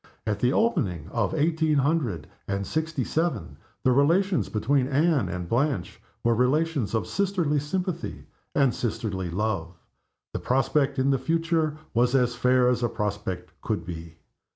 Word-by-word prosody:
At 105 -2 -1
the 125 +3 +3
opening 105 - 0
of 120 +9 -1
eighteen 160 0 +2
hundred 135 - +1 0.2
and 100 0 -1
sixty 155 -1 -1
seven 150 - -2 0.3
the 130 - +4
relations 165 - +3
between 130 +5 +1
Anne 145 - +2
and 90 -2 -4
Blanche 125 - -1 0.2
were 115 - +4
relations 130 0 +1
of 110 -5 0
sisterly 180 - 0
sympathy 175 +3 -3 0.3
and 135 -5 +4
sisterly 100 -6 -2
love. 95 -2 -2 0.6
The - - -2
prospect 135 +2 +1
in 135 +1 +3
the 135 - +2
future 160 +1 0 0.2
was 120 +2 +3
as 125 -2 +3
fair 125 0 +3
as 125 -1 +2
a 120 - +1
prospect 100 -5 -3
could - - -2
be. 85 -1 -8
130 Hz, 150 wpm, -26 LUFS, 105-155 Hz, 0.6 s, the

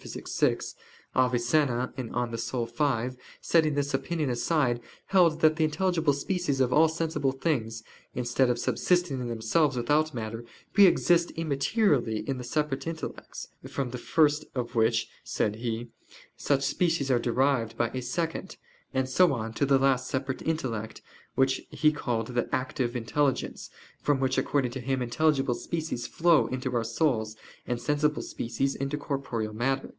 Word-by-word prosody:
vi), - - 0 0.6
Avicenna 125 +1 +2
(De - - -3
Anima 120 +1 -1
v) 130 - -13 0.2
setting 155 -3 +2
this 145 0 -1
opinion 150 0 -1
aside, 120 -1 +1 0.2
held 170 -4 +3
that 155 0 +5
the 160 - +2
intelligible 165 0 +1
species 145 -1 -1
of 125 -1 +2
all 160 +3 +6
sensible 160 -4 -1
things, 120 -6 -2 0.3
instead 125 +1 +1
of 120 - +1
subsisting 175 +1 +1
in 125 - -3
themselves 120 +5 +1
without 150 +6 +2
matter, 115 -2 -5 0.3
pre 200 -1 +8
exist 170 -1 +3
immaterially 140 - +1
in 135 -2 -2
the - - -5
separate 150 +3 -2
intellects: 165 -1 -6 0.2
from 135 -3 -3
the 125 - -5
first 150 +2 +2
of 120 -2 -3
which, 115 -1 +2 0.2
said 105 0 -1
he, 115 0 -3 0.5
such 140 -1 0
species 165 -2 +1
are 125 - +4
derived 120 -1 +1
by 120 - +1
a 130 - -4
second, 165 +8 -3 0.4
and 130 0 +1
so 175 +6 +4
on 115 -2 -4
to 140 - 0
the 135 -1 +5
last 130 -1 +2
separate 130 0 -3
intellect 120 -9 -3 0.3
which 135 0 +2
he 155 0 +3
called 115 -6 -2
the 120 -1 -1
"active 130 -1 -1
intelligence," 130 +4 -1 0.3
from 145 -2 +2
which, 130 -1 0
according 135 -4 0
to 130 - -5
him, 135 +1 -1
intelligible 135 +1 +1
species 125 0 -4
flow 170 -1 +3
into 130 0 -3
our 115 - +1
souls, 115 -3 0 0.3
and 120 -1 -1
sensible 150 +4 +1
species 135 +4 -2
into 140 +2 -3
corporeal 130 -7 -3
matter. 135 +4 -1
135 Hz, 155 wpm, -28 LUFS, 120-150 Hz, 0.6 s, pre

